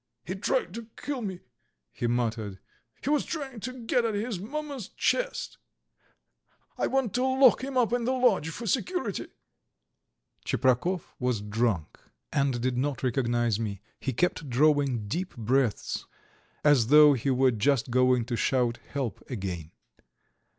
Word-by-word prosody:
"He - - -3
tried - - -1
to 230 -1 -7
kill 280 -3 -4
me," 190 -5 -5 0.5
he 120 - -2
muttered. 115 -4 -1 0.5
"He 280 - 0
was 300 - +3
trying 275 -7 -5
to 255 +4 -5
get 245 +1 +2
at 225 -2 0
his 210 -2 -2
mamma's 275 +1 -5
chest.... - - -1 1.2
I - - 0
want 265 -5 0
to 250 - +1
lock 260 -1 +5
him 270 -1 -3
up 240 -2 +2
in 245 -1 +1
the 255 - +1
lodge 240 - +2
for 235 +8 -6
security." 350 - -1 1.2
Tcheprakov 130 +8 +1 0.2
was 125 -3 0
drunk 105 -5 -1 0.3
and 140 -4 +1
did 125 0 0
not 140 0 -2
recognize 120 -3 +1
me; 100 -3 -4 0.2
he 135 - -2
kept 155 +2 0
drawing 135 -4 +2
deep 180 - -3
breaths, 120 0 0 0.6
as 145 -6 +5
though 150 +2 +8
he 135 +1 -1
were 130 0 +4
just 120 +2 +1
going 125 -1 +3
to 120 0 -2
shout 120 -1 +1
"help" 130 -8 -5
again. 95 - -4
140 Hz, 145 wpm, -28 LUFS, -, 1.2 s, though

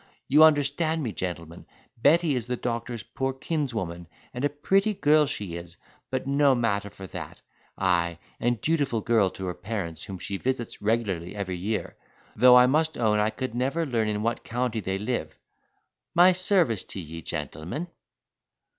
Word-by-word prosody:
You 150 +3 +6
understand 155 +1 +3
me, 115 - -2
gentlemen. 85 -3 -6 0.3
Betty 155 +5 +3
is 125 -3 -2
the 125 0 -2
doctor's 115 -2 -3
poor 135 +5 -3
kinswoman, 115 - -3 0.3
and 125 - -5
a 145 - +3
pretty 195 +9 +1
girl 150 -2 +4
she 100 -10 -4
is; 85 0 -9 0.3
but - - -2
no 140 0 +4
matter 100 -4 0
for 95 - -10
that; - - -8 0.4
ay, 85 -3 +1 0.2
and 120 -1 0
dutiful 145 -7 0
girl 110 -4 +3
to 95 - -7
her 90 - -2
parents, 90 -3 -5
whom 95 - -7
she 100 +2 -4
visits 125 +1 -3
regularly 100 -5 -1
every 95 -3 -3
year, 105 +5 -3 0.4
though 125 0 +7
I 125 - +8
must 155 +4 +1
own 110 -3 +2
I 105 +1 +2
could 130 +1 -5
never 135 +7 0
learn 115 -6 0
in 105 0 -1
what 115 +1 -1
county 120 -1 -2
they 95 -1 -2
live, 110 +5 -3 0.8
My 175 +2 +7
service 180 - +3
t'ye, 80 -3 -7
gentlemen." 80 - -4
115 Hz, 165 wpm, -26 LUFS, 95-140 Hz, 0.8 s, I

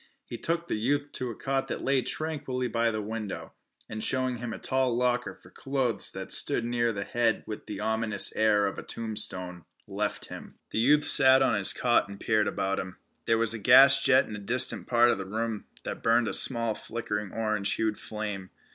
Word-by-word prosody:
He - - -9
took 170 +6 -3
the 110 - -3
youth 145 +5 -2
to 125 - -4
a 115 - -8
cot 135 0 -3
that - - -6
lay 135 -1 +1
tranquilly 145 -4 -4
by 115 -1 -1
the 110 -1 -4
window, 110 -2 -7 0.3
and 110 0 -6
showing 130 -1 +1
him 120 0 -7
a - - -7
tall 130 -3 -1
locker 125 0 -1
for - - -20
clothes 135 -4 -2
that - - -8
stood 115 - +2
near 120 -1 -1
the 100 -2 -5
head 115 +1 -1
with 105 - -9
the 105 -2 -7
ominous 110 -2 0
air 105 -2 +2
of 100 - -4
a - - -8
tombstone, 90 -6 -1 0.2
left - - -4
him. - - -12 0.2
The - - -2
youth 145 +5 +3
sat 130 -1 +8
on - - +1
his 100 -2 +8
cot 120 -4 0
and 100 0 -11
peered 105 -2 0
about 95 0 -3
him. 90 0 -8 0.3
There 115 - +2
was 115 0 +4
a 110 - -5
gas 135 +4 +6
jet 130 -1 +3
in 105 - -8
a - - -8
distant 120 +6 0
part 120 0 +3
of - - -3
the 95 - -7
room, 110 +1 -5 0.2
that - - -7
burned 115 0 +1
a - - -4
small 115 -3 +4
flickering 105 -3 -6
orange 110 -3 -1
hued 110 -1 -2
flame. 105 -4 -7
115 Hz, 210 wpm, -26 LUFS, 105-130 Hz, 0.3 s, sat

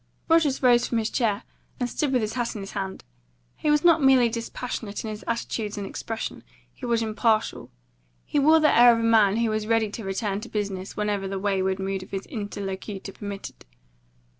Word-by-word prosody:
Rogers 320 -5 +3
rose 240 -1 +5
from 235 - -1
his 220 -1 -1
chair, 215 -5 0 0.4
and 245 - 0
stood 275 +3 -1
with 250 -4 +2
his 215 - -2
hat 240 -2 -2
in 210 - -5
his 195 - -7
hand. 195 -2 -5 0.5
He 300 - -2
was 300 0 +3
not 335 -2 +5
merely 260 -3 +5
dispassionate 230 -2 -5
in 220 - -4
his 210 0 -7
attitude 225 -2 -3
and 200 - -3
expression, 225 +3 -5 0.3
he 250 - -7
was 230 -1 +1
impartial. 220 0 0 0.6
He 290 - 0
wore 310 +3 +6
the 305 -1 +4
air 240 0 +8
of 230 - 0
a - - -1
man 220 -3 +4
who 230 -1 +1
was 215 0 -2
ready 225 -2 +2
to 220 - -6
return 195 +1 -2
to 240 - -9
business 200 -2 -4
whenever 205 -2 -1
the 195 0 -3
wayward 190 -1 0
mood 195 0 -3
of 185 - -11
his 195 0 -4
interlocutor 200 -2 -5
permitted. 200 0 -8
220 Hz, 200 wpm, -25 LUFS, 200-240 Hz, 0.6 s, air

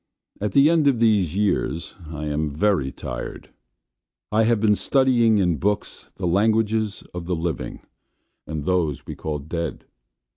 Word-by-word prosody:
At 105 -1 -2
the 140 +1 +6
end 160 -3 +3
of 130 -5 +3
these 100 -7 +2
years 100 -4 0 0.2
I 75 -1 -5
am 75 +1 -1
very 75 -2 +1
tired. - - -7 0.8
I 110 +1 +3
have 115 -1 +3
been 105 0 +4
studying 120 -3 +3
in 90 -5 +2
books 105 +6 -2
the 95 - -4
languages 110 +3 +1
of 90 -1 -5
the 90 0 -1
living 80 -3 -4 0.7
and 75 -2 -4
those 85 -5 0
we - - -6
call 75 -1 -4
dead. 80 +3 -5
95 Hz, 150 wpm, -23 LUFS, 80-110 Hz, 0.8 s, the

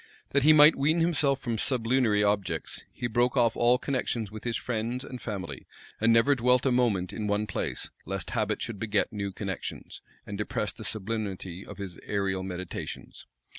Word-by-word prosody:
That 140 - +3
he 150 +4 +7
might 155 +1 +8
wean 155 +4 +2
himself 150 -5 +2
from 115 -2 -2
sublunary 115 -4 +2
objects, 100 -6 -1
he - - -5
broke 120 +3 +1
off 115 -2 +4
all 120 +1 +4
connections 125 -5 -2
with 110 +1 -9
his 120 -1 0
friends 120 +2 -2
and 125 -3 -8
family, 90 - -5 0.3
and 115 +1 +4
never 115 +5 +5
dwelt 125 0 +3
a 135 - +3
moment 110 -8 +1
in 105 -2 -3
one 105 +1 +1
place; 105 - -3 0.2
lest - - -3
habit - - 0
should 110 -4 -5
beget 105 0 0
new 100 -2 -3
connections, 95 -1 -6 0.2
and 100 0 -6
depress 105 0 -1
the 110 - -9
sublimity 100 -4 -4
of 105 - -10
his 95 -3 -7
aerial 100 -2 0
meditations. 90 -1 -6
110 Hz, 175 wpm, -28 LUFS, 100-125 Hz, 0.3 s, might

